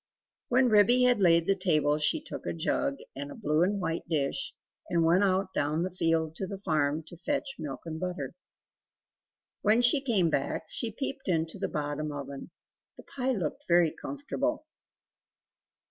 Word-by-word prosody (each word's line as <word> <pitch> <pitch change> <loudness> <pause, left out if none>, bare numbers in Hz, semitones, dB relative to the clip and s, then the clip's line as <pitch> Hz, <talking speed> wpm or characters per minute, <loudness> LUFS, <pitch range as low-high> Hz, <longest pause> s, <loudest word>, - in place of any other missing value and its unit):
When 255 0 +4
Ribby 220 +4 +6
had 250 -3 +4
laid 170 -2 +5
the 195 - +3
table 155 -5 +2
she 150 - +2
took - - -8
a - - -1
jug 275 - -1 0.2
and 140 +1 -5
a - - -8
blue 150 +2 +1
and 200 +3 +2
white 165 -2 -3
dish, 155 - -1 0.4
and 170 -2 +2
went 175 +4 +4
out 190 0 +1
down 150 +3 0
the 185 - -3
field 165 -2 0
to 190 - -3
the 195 - -5
farm, 155 -4 0
to 175 - -12
fetch 280 - -2
milk 145 -4 -5
and 160 -1 -5
butter. 175 -7 -4 1.3
When 225 +3 +4
she 245 +4 +4
came 205 - +2
back, 140 - -1
she 230 - -2
peeped 270 +3 -5
into 165 -3 -1
the - - -1
bottom 150 0 -3
oven; 140 0 -7 0.5
the - - -12
pie 265 -1 -2
looked 175 -10 -3
very 170 -2 +4
comfortable. 290 +1 -3
175 Hz, 170 wpm, -29 LUFS, 155-230 Hz, 1.3 s, Ribby